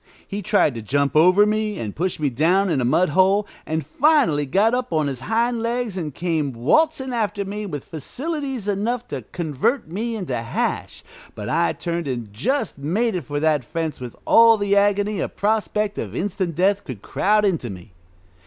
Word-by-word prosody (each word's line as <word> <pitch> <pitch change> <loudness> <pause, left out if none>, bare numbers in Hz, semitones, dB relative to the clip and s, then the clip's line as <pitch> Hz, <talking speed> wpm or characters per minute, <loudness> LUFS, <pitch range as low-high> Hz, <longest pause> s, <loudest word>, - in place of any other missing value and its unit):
He 200 +1 -4
tried 200 - +2
to 115 - -6
jump 140 +7 0
over 180 +6 +6
me, 215 0 -1
and 105 -3 -5
push 180 +3 -1
me 145 -3 0
down 175 +9 +2
in 135 - +1
a - - 0
mud 165 +9 +3
hole, 190 +6 +3 0.2
and 160 -2 -2
finally 195 - +2
got 205 - +3
up 250 -3 -1
on 155 -2 +1
his 135 -3 -3
hind 230 - 0
legs 235 -2 -2
and 165 -5 -3
came 160 -3 -1
waltzing 265 - +1
after 210 -3 -1
me 205 +1 -5
with 145 -7 -5
facilities 270 - -5
enough 225 +5 -1
to - - -4
convert 165 - -1
me 225 +5 -2
into 180 - -3
hash, 115 -1 -3 0.3
but 105 - -6
I 170 +2 +2
turned 170 -2 -3
and 120 -6 -4
just 220 - -1
made 185 +5 0
for 145 +3 -3
that 155 -4 +2
fence 160 +3 -4
with 125 -2 -7
all 230 0 +7
the 200 -1 +1
agony 205 0 +2
a - - -1
prospect 210 0 -1
of 105 0 -5
instant 185 -2 -2
death 195 +4 +2
could 125 -9 -8
crowd 210 +1 +2
into 165 -11 0
me. 90 -1 -10
185 Hz, 185 wpm, -22 LUFS, 145-215 Hz, 0.3 s, all